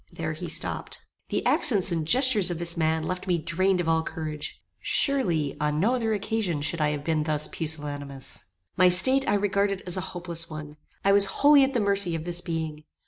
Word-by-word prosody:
There - - -5
he - - -7
stopped. - - -2 0.3
The - - -3
accents 200 - +1
and 160 -2 -3
gestures 245 - +3
of 175 - -4
this 170 0 +1
man 160 -1 -1
left 180 +3 -5
me 180 -2 +1
drained 185 +3 0
of 175 - -2
all 160 0 +2
courage. 155 -2 -7 0.2
Surely, 175 - +3
on 150 0 -1
no 220 +9 +1
other 230 -3 -1
occasion 205 -7 -2
should 165 +2 +1
I 150 - +2
have 145 -1 -4
been 160 -1 -1
thus 150 -1 +1
pusillanimous. 145 - -1 0.3
My 185 -1 +4
state 260 +10 +6
I - - +2
regarded 200 -1 -1
as 180 0 -1
a - - -2 0.2
hopeless 170 -1 -2
one. 155 -1 -9 0.3
I 200 - +4
was 200 0 +3 0.2
wholly 290 -1 +7
at 270 0 -1
the - - +2
mercy 200 -4 0
of 160 - -5
this 175 0 -2
being. 160 -3 -5
170 Hz, 200 wpm, -25 LUFS, 155-200 Hz, 0.3 s, wholly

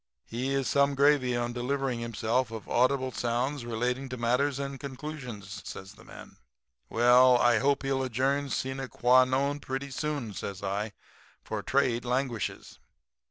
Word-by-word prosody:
He 125 +4 -3
is 135 -1 0
some 140 0 +3
gravy 140 -3 +3
on 120 0 -2
delivering 130 0 -1
himself 115 +2 -1
of 110 -2 -8
audible 130 +1 +2
sounds 120 +3 -1
relating 125 +3 -2
to 130 - -5
matters 125 +4 +1
and 140 -1 -4
conclusions,' 130 -8 -7
says 95 +1 -8
the - - -17
man. - - -13 0.5
"'Well, 125 +2 +6
I 120 -2 +4
hope 140 +1 +1
he'll 135 -1 0
adjourn, 135 +3 0
sine 135 0 -3
qua 125 +1 +4
non, 140 +3 0
pretty 135 0 -5
soon,' 140 -5 -3
says 100 0 -6
I, 100 +2 -2 0.5
'for - - -4
trade 130 -3 +1
languishes.' 125 -3 -3
130 Hz, 150 wpm, -29 LUFS, 120-135 Hz, 0.5 s, Well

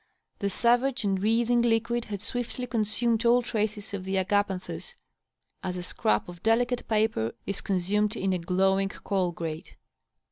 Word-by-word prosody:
The 200 - 0
savage 245 +5 +2
and 195 -2 0
seething 235 +3 +3
liauid 235 0 +1
had 205 -1 -6
swiftly 245 +1 -3
consumed 230 0 +1
all 240 +1 +5
traces 215 -2 -2
of 195 -2 -3
the 190 +1 -2
agapanthus, 200 - -1 0.7
as 180 -1 -3
a 180 - -4
scrap 105 -11 0
of 175 -1 -10
delicate 245 +2 +1
paper 215 - +1
is 200 - -3
consumed 205 +3 0
in 195 -3 0
a 180 - 0
glowing 190 +3 +2
coal 190 -3 -1
grate. 165 -2 -6
210 Hz, 150 wpm, -28 LUFS, 190-235 Hz, 0.7 s, all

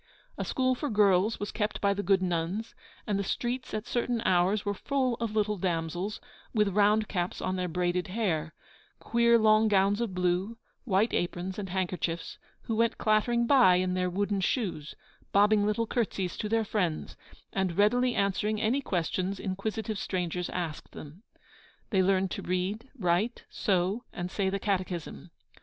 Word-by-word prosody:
A - - -3
school 255 -1 +1
for 290 +3 -3
girls 205 -1 +3
was 205 - -4
kept 210 -1 -2
by 200 -1 +2
the 200 - -2
good 195 -2 +2
nuns, 180 +5 -2 0.3
and 205 -2 0
the - - 0
streets 240 +6 -3
at 215 +1 -3
certain 245 -1 -1
hours 185 +3 +2
were 205 - 0
full 260 +3 0
of 225 -2 -3
little 210 -1 +1
damsels, 175 +2 -2 0.4
with 210 -2 +3
round 210 +2 +3
caps 175 -2 -2
on 185 - -2
their 180 -1 -1
braided 180 +1 -1
hair, 180 -6 -1 0.4
queer 235 0 +3
long 215 0 +5
gowns 200 +1 +3
of 215 -6 -2
blue, 180 +5 0 0.3
white 210 0 +2
aprons 180 +2 -2
and 195 -2 -5
handkerchiefs, 180 -2 -3 0.2
who 225 - -2
went 230 +1 +1
clattering 235 +2 +2
by 240 -8 +6
in 180 0 +1
their 180 0 0
wooden 200 +2 -1
shoes, 180 - -2 0.4
bobbing 205 +1 +4
little 210 +2 +1
curtsies 200 -6 -2
to 210 - -4
their 225 0 +1
friends, 180 -7 -2 0.4
and 190 -3 -1
readily 245 +4 +3
answering 205 +2 0
any 235 +6 +1
questions 185 - -2
inquisitive 215 +2 -3
strangers 180 -2 -2
asked 170 -4 -5
them. 155 +6 -10 0.7
They 190 -3 +3
learned 190 0 +2
to - - -4
read, 190 +7 -2
write, 195 +4 0
sew, 195 +4 0
and 175 +1 -5
say 195 -2 0
the 195 - -1
catechism. 185 - -3
200 Hz, 165 wpm, -29 LUFS, 180-220 Hz, 0.7 s, by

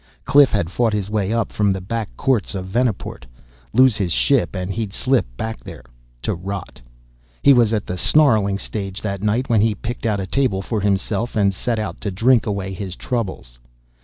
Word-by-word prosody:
Cliff 140 -2 +6
had 85 -5 -1
fought 115 +1 +1
his 105 -1 -2
way 105 -2 0
up 115 0 0
from 105 -1 +1
the 95 -1 0
back 110 +4 -4
courts 120 -6 0
of 95 -1 -4
Venaport. 110 - -2 0.4
Lose 130 -1 +5
his 95 -4 -1
ship - - +2
and 90 +1 -3
he'd 110 -2 -3
slip 130 - +1
back 110 0 -5
there - - -10 0.4
to - - 0
rot. 95 -5 -6 0.6
He 140 - +8
was 120 -4 +4
at 110 -2 -1
the 90 0 -4
snarling 110 - +3
stage 100 -1 -5
that 100 -2 -3
night 110 +5 0
when 115 -4 +3
he 110 -1 +2
picked 115 +2 -4
out 105 -2 0
a 95 - -2
table 100 -3 0
for 110 +1 -2
himself 100 +4 -1
and 100 -2 +3
set 115 +4 -2
out 105 -2 -4
to 105 - -2
drink 115 +6 +3
away 100 -2 -2
his 95 -1 -6
troubles. 95 - -4
105 Hz, 195 wpm, -21 LUFS, 95-115 Hz, 0.6 s, He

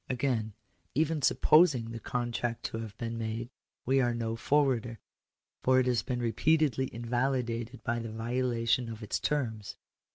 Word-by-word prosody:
Again; 120 -4 -1 0.4
even 160 +1 +1
supposing 135 -5 +4
the 115 - -6
contract 120 0 -2
to 115 - -3
have 110 -3 -7
been 115 -1 -4
made, 115 +2 -4 0.3
we 135 +2 +3
are 120 -1 +1
no 115 -1 -2
forwarder, 125 -3 +1 0.6
for 130 0 +4
it 130 - +2
has 125 -3 +2
been 125 0 -3
repeatedly 130 +2 +2
invalidated 120 -1 -2
by 120 0 -1
the 115 -1 -5
violation 120 +1 0
of 110 0 -7
its 105 - -2
terms. 115 -8 -2
120 Hz, 150 wpm, -30 LUFS, 115-130 Hz, 0.6 s, supposing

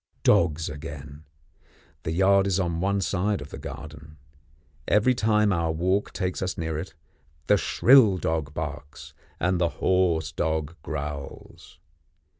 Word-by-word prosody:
Dogs 80 -1 +3
again. 75 0 -8 0.8
The 80 - -3
yard 95 +3 +3
is 95 -1 +1
on 85 -2 -1
one 100 +1 +1
side 100 +1 0
of 75 -1 -10
the - - -7
garden. 75 +2 -10 0.7
Every 105 +5 +4
time 105 -3 +2
our 85 -2 0
walk 95 +5 0
takes 90 -1 -3
us 95 0 -2
near 80 -1 -3
it, 90 +3 -8 0.5
the 105 - +4
shrill 115 -1 +5
dog 80 -4 -2
barks, 75 -2 -7 0.3
and 90 +1 0
the 85 - +3
hoarse 85 -5 +1
dog 80 -2 -2
growls. 75 -3 -7
85 Hz, 135 wpm, -25 LUFS, 75-95 Hz, 0.8 s, shrill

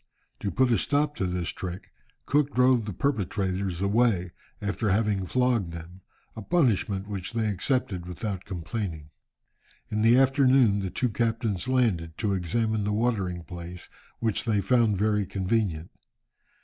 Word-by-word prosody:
To 100 - -2
put 125 +6 +2
a 115 - +3
stop 145 +4 +1
to 95 - 0
this 90 -1 -2
trick, 90 0 -6 0.3
Cook 145 0 +1
drove 125 -2 +4
the 105 - -4
perpetrators 95 -6 -1
away, 100 -4 +2 0.3
after 105 +1 -1
having 100 -1 +1
flogged 120 -7 +1
them, 85 +3 -10 0.3
a 110 - -6
punishment 105 - +1
which 100 0 -5
they 115 -1 0
accepted 100 -3 -1
without 95 +1 -4
complaining. 90 -4 -5 0.8
In 105 0 0
the 115 +3 +6
afternoon 130 -5 +4
the 95 -1 -2
two 125 +7 0
captains 110 -2 -1
landed, 100 -11 +1
to 105 -3 0
examine 110 +4 0
the 105 - -1
watering 105 -6 -1
place, 90 0 -9 0.3
which 115 0 0
they 110 -3 +2
found 110 0 +2
very 105 +1 +2
convenient. 95 -4 -1
105 Hz, 145 wpm, -27 LUFS, 90-120 Hz, 0.8 s, the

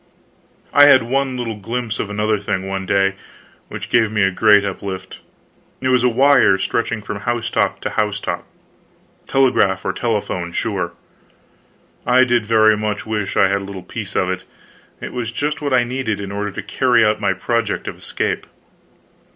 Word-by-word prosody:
I 145 - +8
had 140 -3 +6
one 130 +2 -1
little 115 -3 -4
glimpse 115 +2 -4
of 105 - -3
another 105 +1 0
thing, 95 -1 -3
one 95 0 -4
day, 95 0 +2 0.5
which - - -8
gave 115 -3 +3
me 105 -2 +1
a 95 - +3
great 105 +1 +4
uplift. 95 -1 -6 0.6
It 130 - -1
was 125 -1 +3
a 125 - +4
wire 125 -5 +4
stretching 110 +2 -2
from 100 0 -5
housetop 120 +2 -1
to - - -3
housetop. 105 -1 -2 0.8
Telegraph 125 -8 +2
or 95 - 0
telephone, 100 -6 -2
sure. 90 -6 -2 1.1
I 125 +1 +4
did 120 -4 +1
very 110 -1 +5
much 105 0 -3
wish 105 -3 -3
I 95 - +5
had 100 0 0
a - - -7
little 95 -2 -8
piece 105 +1 -7
of 95 - +1
it. 95 0 -4 0.6
It - - -7
was 120 -2 -3
just 150 +5 -2
what 145 -1 -2
I 125 -2 +4
needed, 120 -4 -3
in 100 -1 -6
order 105 +1 -3
to 100 - -7
carry 125 -4 +2
out 105 0 +1
my 100 -2 +2
project 115 +4 -2
of - - -4
escape. - - -3
110 Hz, 175 wpm, -19 LUFS, 100-120 Hz, 1.1 s, I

